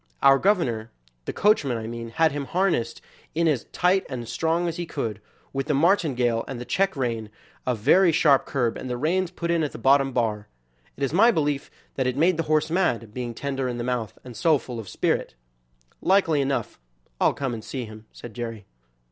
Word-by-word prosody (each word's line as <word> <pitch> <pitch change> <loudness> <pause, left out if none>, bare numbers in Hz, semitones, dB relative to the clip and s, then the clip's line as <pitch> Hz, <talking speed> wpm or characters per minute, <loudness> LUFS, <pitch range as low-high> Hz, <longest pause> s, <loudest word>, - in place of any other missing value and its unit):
Our 135 0 +7
governor 125 - +1 0.4
(the - - -2
coachman, 150 - +2
I 110 - -5
mean) 115 0 -6
had 160 +7 +2
him 145 0 -3
harnessed 170 -10 0 0.3
in 170 +1 +2
as 145 -7 +1
tight 185 +2 +2
and 120 -4 -5
strong 165 +5 0
as 165 - -3
he 175 -1 -4
could, 110 -9 -4 0.3
with 135 0 -2
the 150 - +1
martingale, 135 - +2
and 130 -3 -5
the 120 - -6
check 195 +4 +1
rein, 115 -5 -2 0.4
a 125 - +2
very 175 - +4
sharp 150 -3 +4
curb, 120 -4 0
and 130 - -6
the 125 - -2
reins 175 +6 0
put 170 -1 -3
in 170 -1 +2
at 150 - -2
the - - -7
bottom 135 0 +4
bar. 110 -4 -1 0.5
It 140 - -4
is 140 - 0
my 215 +7 +6
belief 145 -8 0 0.3
that 130 -2 +1
it 130 +1 -1
made 165 +3 +3
the 165 - 0
horse 155 0 +2
mad, 120 - 0
being 120 -1 -4
tender 135 -1 -2
in 120 -1 -3
the 120 - -3
mouth 120 -3 -3
and 125 -2 -10
so 160 +3 +3
full 125 -3 -7
of 110 - -8
spirit." - - -1 0.7
"Likely 175 -6 +3
enough; 135 0 -2 0.4
I'll - - +3
come 135 -3 -2
and 110 -2 -6
see 130 0 -5
him," 110 0 -12
said 120 - -10
Jerry. 115 -3 -6
135 Hz, 205 wpm, -25 LUFS, 120-165 Hz, 0.7 s, Our